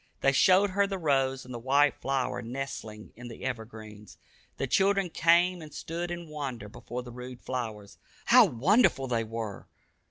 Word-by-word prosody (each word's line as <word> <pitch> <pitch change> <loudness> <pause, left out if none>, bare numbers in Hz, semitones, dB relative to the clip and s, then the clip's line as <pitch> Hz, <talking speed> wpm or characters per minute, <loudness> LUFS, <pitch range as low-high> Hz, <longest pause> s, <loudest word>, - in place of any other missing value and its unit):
They 135 - +4
showed 185 +7 +4
her 200 +1 +2
the 195 -1 -3
rose 135 -5 0
and 125 - -9
the 120 - -5
white 140 +3 +3
flower 135 -2 -2
nestling 115 -3 -7
in 120 +1 -10
the 115 - -9
evergreens. 110 -4 -7 0.4
The - - -1
children 195 +5 +2
came 175 +2 +3
and 155 -1 -10
stood 170 +3 -5
in 175 -1 -6
wonder 135 -8 -5
before 120 +4 -7
the 120 - -10
rude 125 +1 -9
flowers. 110 -6 -6 0.3
How 245 -1 +7
wonderful 155 - +3
they 115 -2 0
were! 110 -2 -6
135 Hz, 165 wpm, -28 LUFS, 115-170 Hz, 0.4 s, How